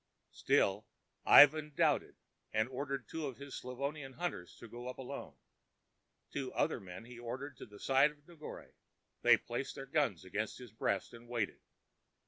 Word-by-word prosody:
Still - - +2 0.4
Ivan 150 0 +8
doubted, - - +2 0.4
and 110 +1 +2
ordered 140 +1 -3
two 160 -2 -3
of 130 - -6
his 140 0 -9
Slavonian 135 +2 -4
hunters 150 - -4
to 120 - -11
go 120 +2 -8
up 125 - -5
alone. 130 - -7 1.0
Two 135 -2 -3
other - - +1
men 95 +2 -9
he 120 0 -11
ordered 130 +3 -5
to - - -9
the 105 -1 -14
side 135 +2 +5
of 150 -1 -18
Negore. 165 -3 -10 0.5
They - - +7
placed - - -4
their 135 - -6
guns 135 - 0
against 105 +4 -3
his 125 -4 -11
breast 100 -2 -1
and 120 0 -12
waited. 115 -4 -2
130 Hz, 160 wpm, -35 LUFS, 115-145 Hz, 1.0 s, Ivan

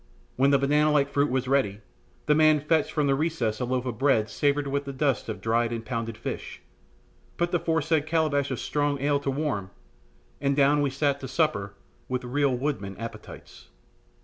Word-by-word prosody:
Then - - -33
when 135 +2 +4
the 140 - +5
banana 150 +3 +2
like 140 -1 +2
fruit 145 +1 +2
was 130 0 -1
ready, 130 -7 +1 0.5
the 150 - +4
man 155 0 +5
fetched 150 +1 +1
from 150 -2 0
a 135 - +3
recess 135 -7 -1
a 125 - -1
loaf 125 0 -1
of 120 -3 -4
bread 135 -6 +2
savoured 145 0 +1
with 140 +1 -2
the 140 - -4
dust 135 -3 0
of - - -5
dried 115 +1 +1
and 115 -1 -4
pounded 115 -2 -4
fish, - - -6 0.8
put 175 0 0
the 175 - +2
foresaid 160 -2 0
calabash 155 -4 +1
of 130 - -3
strong 145 -1 -1
ale 145 +1 +1
to 140 - -3
warm, 135 -9 -2 0.7
and 140 -1 +1
down 145 +1 +4
we 145 - +1
sat 140 +1 0
to 135 - -6
supper 130 -9 0 0.3
with 125 0 -2
real 135 +1 +1
woodman 120 -8 -3
appetites. 115 -1 -10
140 Hz, 195 wpm, -26 LUFS, 125-150 Hz, 0.8 s, the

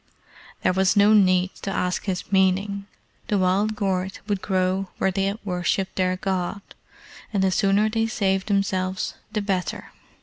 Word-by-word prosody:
There - - +3
was 190 +1 +2
no 205 +1 +6
need 185 -2 +4
to - - -3
ask 180 -2 -1
his 190 -1 -3
meaning. 195 +1 +1 0.4
The 210 - +1
wild 195 +3 +1
gourd 190 -2 -1
would 200 -3 -1
grow 190 0 0
where 190 - +1
they 195 +1 0
had 200 +2 -1
worshipped 180 +1 -1
their 185 0 +1
God, 190 +1 -2 0.7
and 200 -3 +1
the 190 - +3
sooner 200 +2 +3
they 225 +1 0
saved 195 -4 0
themselves 190 -2 0 0.2
the 210 -1 -2
better. 190 -3 -3
190 Hz, 160 wpm, -24 LUFS, 185-200 Hz, 0.7 s, no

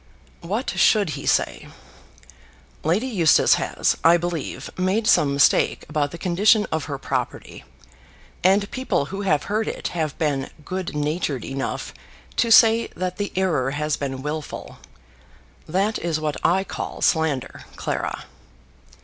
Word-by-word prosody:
"What 210 +10 -2
should 205 -7 +3
he 140 -1 -6
say? - - 0 1.2
Lady 180 +10 +1
Eustace 190 -11 +4
has, - - 0
I 170 +1 +6
believe, 175 -3 -4
made 190 +5 0
some 150 -9 +4
mistake 140 0 +3
about 150 -1 -1
the 170 - -8
condition 205 +5 +3
of 160 -1 -1
her 145 -3 -4
property, 130 - -4 0.8
and 200 +2 +3
people 260 - -1
who 195 - -3
have 150 -7 +1
heard 215 +2 -1
it - - -3
have 155 -4 -3
been 140 -4 -1 0.2
good 185 -2 -4
natured 150 -4 -2
enough 135 0 -4 0.4
to 235 - +2
say 225 0 +6
that 180 0 -3
the 205 -1 -3
error 165 -9 +1
has 150 0 0
been 135 -2 -5
wilful. 150 0 -6 0.9
That 195 +6 0
is 165 -2 -1
what 155 -1 -3
I 190 +3 +3
call - - -6
slander, 160 -6 0
Clara." - - -3
170 Hz, 140 wpm, -23 LUFS, 150-195 Hz, 1.2 s, I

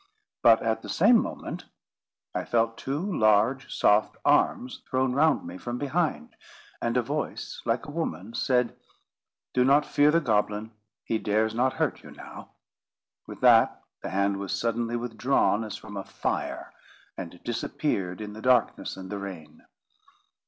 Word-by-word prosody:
But, 115 -1 +6
at 110 0 0
the - - -9
same 220 +6 +5
moment, - - -6 0.7
I - - -2
felt 115 -1 +1
two 140 +2 -2 0.2
large 110 +5 +3
soft 105 +1 +2
arms 125 - +2
thrown 130 0 +1
round 150 +2 +3
me 90 +2 -8
from 120 0 -4
behind; 145 - -1 0.5
and 120 +1 0
a 125 - +2
voice 145 +6 -4
like 115 +1 0
a - - -8
woman's 115 - -4
said: 125 -2 +1 0.8
"Do 125 - +3
not 140 +3 +4
fear 145 +1 +3
the 165 +2 +4
goblin; 105 -4 0 0.3
he 110 - -1
dares 110 +1 +1
not 130 +3 +1
hurt - - -1
you - - -13
now." - - -11 0.8
With - - -10
that, - - +5 0.2
the - - -5
hand 100 +1 +1
was 100 0 -4
suddenly 115 +3 -1
withdrawn 120 -1 +1
as 105 -1 -6
from 105 -1 -10
a 100 - -4
fire, - - -4 0.4
and 85 +1 -8
disappeared 110 - -2
in 105 -1 -6
the 110 - -9
darkness 125 -5 +1
and 95 0 -8
the 100 - -3
rain. 85 -6 -9
115 Hz, 155 wpm, -27 LUFS, 105-130 Hz, 0.8 s, But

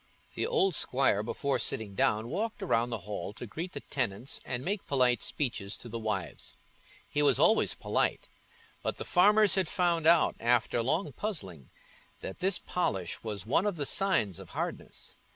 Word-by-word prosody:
The - - 0
old 195 - +2
squire, 130 -8 +2
before 135 +5 -1
sitting 105 -3 -1
down, 105 +3 +1
walked 210 - -3
round 120 -9 +1
the 115 -3 -3
hall 105 -1 -5
to 120 - -8
greet 165 - -6
the - - -5
tenants 120 -2 -2
and 125 0 -4
make 200 +1 -2
polite 125 -3 +2
speeches 110 -8 -2
to - - -8
the 115 0 -5
wives: 95 -7 -4 0.5
he 150 - -1
was 145 - +4
always 170 +10 +4
polite; - - -1 0.5
but - - -2
the - - -5
farmers 205 +2 +5
had 190 -3 +2
found 170 -4 +1
out, 170 0 +5
after 120 0 +2
long 160 +11 0
puzzling, 95 - -5 0.5
that 95 - -7
this 185 0 +2
polish 95 - -2
was 105 -4 -5
one 145 - +2
of 205 - -1
the 145 - -2
signs 140 - +2
of - - -11
hardness. - - -5
135 Hz, 170 wpm, -30 LUFS, 110-180 Hz, 0.5 s, farmers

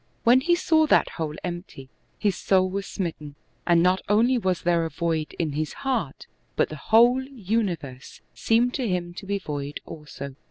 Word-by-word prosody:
When 245 +3 +5
he 345 +5 +3
saw 320 -2 +3
that - - +4
hole 155 -3 -4
empty, 175 -6 -7 0.3
his 205 -3 0
soul 185 -1 +2
was 195 +1 -3
smit 175 -5 -3
ten, 145 -2 -10 0.3
and 170 -1 +4
not 185 +1 +3
only 230 +5 +4
was 190 -7 -1
there 170 -1 +2
a 165 - -2
void 160 -2 -2
in 160 -3 -1
his 155 +2 -3
heart, 240 - -2 0.3
but - - +1
the 155 - -6
whole 235 - +4
universe 200 - -4
seemed 240 +2 +2
to 255 -4 -1
him 175 -1 -2
to 190 +2 -9
be 200 0 0
void 145 -5 -5
also. 150 -3 -8
180 Hz, 185 wpm, -25 LUFS, 160-230 Hz, 0.3 s, When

